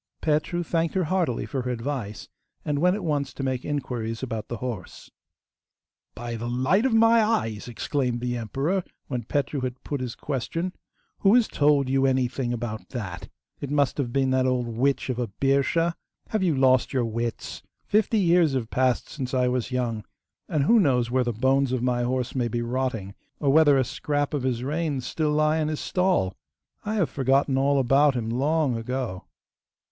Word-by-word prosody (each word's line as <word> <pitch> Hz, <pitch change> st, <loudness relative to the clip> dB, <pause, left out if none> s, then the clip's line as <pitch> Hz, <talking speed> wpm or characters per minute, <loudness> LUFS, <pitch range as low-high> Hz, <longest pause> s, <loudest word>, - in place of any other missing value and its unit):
Petru 155 Hz, +3 st, 0 dB
thanked 165 Hz, +1 st, -1 dB
her 190 Hz, -, +2 dB
heartily 160 Hz, -, 0 dB
for 130 Hz, +5 st, -3 dB
her 125 Hz, -, -4 dB
advice, 120 Hz, -3 st, -4 dB, 0.4 s
and 145 Hz, -1 st, 0 dB
went 180 Hz, +4 st, +3 dB
at 205 Hz, -, -5 dB
once 145 Hz, -5 st, -1 dB
to 135 Hz, -, -4 dB
make 130 Hz, -2 st, -1 dB
inquiries 120 Hz, -5 st, -3 dB
about 115 Hz, -4 st, -4 dB
the 120 Hz, -, -4 dB
horse. 115 Hz, -7 st, -7 dB, 1.0 s
'By 120 Hz, 0 st, -5 dB
the 120 Hz, +2 st, -4 dB
light 140 Hz, -, +2 dB
of 250 Hz, -, -1 dB
my 225 Hz, 0 st, +6 dB
eyes!' 210 Hz, -, 0 dB
exclaimed 125 Hz, +1 st, -1 dB
the 120 Hz, 0 st, -2 dB
emperor 135 Hz, -, -1 dB, 0.3 s
when 125 Hz, -4 st, -3 dB
Petru 145 Hz, +2 st, -1 dB
had 125 Hz, 0 st, -4 dB
put 145 Hz, -3 st, -3 dB
his 125 Hz, -2 st, -4 dB
question. 165 Hz, +6 st, -3 dB, 0.5 s
'Who 200 Hz, +3 st, +5 dB
has 245 Hz, -3 st, +4 dB
told 145 Hz, -2 st, +3 dB
you 135 Hz, +1 st, +2 dB
anything 130 Hz, -1 st, 0 dB
about 115 Hz, -2 st, -4 dB
that? 100 Hz, -8 st, -6 dB, 0.3 s
It 140 Hz, -, -5 dB
must 145 Hz, -1 st, +1 dB
have 125 Hz, -4 st, -1 dB
been 135 Hz, 0 st, +1 dB
that 130 Hz, 0 st, +2 dB
old 125 Hz, -1 st, +1 dB
witch 130 Hz, +4 st, 0 dB
of 125 Hz, -, -4 dB
a 120 Hz, -, -1 dB
Birscha? 140 Hz, -, +1 dB, 0.4 s
Have 215 Hz, -, 0 dB
you 175 Hz, -5 st, +2 dB
lost 130 Hz, -1 st, +3 dB
your 125 Hz, -3 st, +1 dB
wits? 115 Hz, 0 st, -4 dB, 0.2 s
Fifty 215 Hz, +2 st, +2 dB
years 175 Hz, -5 st, +4 dB
have 120 Hz, -4 st, -2 dB
passed 130 Hz, -1 st, +1 dB
since 130 Hz, -3 st, -4 dB
I 125 Hz, -1 st, +2 dB
was 125 Hz, -1 st, -1 dB
young, 120 Hz, -4 st, -2 dB, 0.5 s
and 150 Hz, -3 st, +1 dB
who 230 Hz, +10 st, +5 dB
knows 125 Hz, -, +2 dB
where 130 Hz, 0 st, +2 dB
the 120 Hz, -, -1 dB
bones 130 Hz, +3 st, +2 dB
of 130 Hz, -2 st, -1 dB
my 125 Hz, -1 st, +1 dB
horse 125 Hz, +1 st, -1 dB
may 125 Hz, -3 st, 0 dB
be 120 Hz, +1 st, -2 dB
rotting, 120 Hz, -5 st, -2 dB, 0.3 s
or 140 Hz, -2 st, +2 dB
whether 150 Hz, -3 st, +6 dB
a 130 Hz, -, +3 dB
scrap 145 Hz, +3 st, -2 dB
of 145 Hz, -, 0 dB
his 125 Hz, -2 st, -1 dB
reins 145 Hz, -2 st, -2 dB
still 155 Hz, -2 st, -1 dB
lie 155 Hz, +1 st, +2 dB
in 155 Hz, -, 0 dB
his 155 Hz, -1 st, -2 dB
stall? 180 Hz, -, +1 dB, 0.5 s
I 215 Hz, +1 st, -2 dB
have 185 Hz, -7 st, +1 dB
forgotten 135 Hz, 0 st, +2 dB
all 140 Hz, +1 st, +2 dB
about 135 Hz, +2 st, +4 dB
him 115 Hz, -2 st, -2 dB
long 140 Hz, +1 st, +1 dB
ago. 115 Hz, -4 st, -4 dB
130 Hz, 190 wpm, -25 LUFS, 120-150 Hz, 1.0 s, my